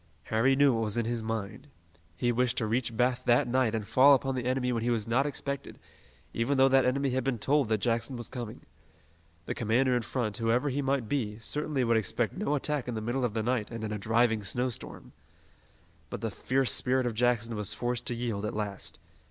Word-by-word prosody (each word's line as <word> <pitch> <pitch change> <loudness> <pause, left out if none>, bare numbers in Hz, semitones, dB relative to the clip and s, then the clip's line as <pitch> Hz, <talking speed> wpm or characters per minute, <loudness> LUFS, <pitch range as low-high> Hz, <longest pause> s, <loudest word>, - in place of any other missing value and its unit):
Harry 125 +5 +4
knew 140 -1 +5
what 115 -1 0
was 105 +1 -1
in 115 - +1
his 120 0 -2
mind. 110 +3 -4 0.5
He 120 +6 +1
wished 125 0 +1
to 110 - +1
reach 115 0 -1
Bath 125 +1 +2
that 120 0 +4
night 125 -2 +1
and 105 -2 -3
fall 130 +5 +7
upon 135 0 -1
the 125 -2 -3
enemy 125 0 0
when 115 -2 -1
he 120 - 0
was 115 -3 -1
not 130 +5 +2
expected, 140 -1 -5 0.6
even 120 +5 0
though 135 0 +6
that 135 0 +4
enemy 135 +1 +1
had 130 0 0
been 135 -2 -1
told 140 +2 +1
that 110 - +2
Jackson 115 +4 -1
was 120 -3 -3
coming. 120 -3 -7 0.8
The - - -2
commander 125 +3 +2
in 120 - +1
front, 115 -2 -2
whoever 120 +4 +1
he 140 +2 -1
might 135 -4 0
be, 105 -5 -2
certainly 145 +3 -2
would 115 -1 +3
expect 110 +2 -1
no 185 -7 0
attack 145 -2 -2
in 120 - -3
the - - -2
middle 120 +4 -2
of 120 -3 -1
the 110 - 0
night 120 -3 -1
and 115 -1 -6
in 110 - -3
a 105 - -3
driving 115 +1 +2
snowstorm. 125 +4 -4 1.0
But - - -6
the - - -2
fierce 130 -1 +1
spirit 130 0 +1
of 120 - -1
Jackson 115 0 +1
was 105 0 -2
forced 120 +1 -2
to 120 - 0
yield 115 -4 -3
at 105 - -3
last. 100 -2 -4
120 Hz, 220 wpm, -29 LUFS, 110-130 Hz, 1.0 s, fall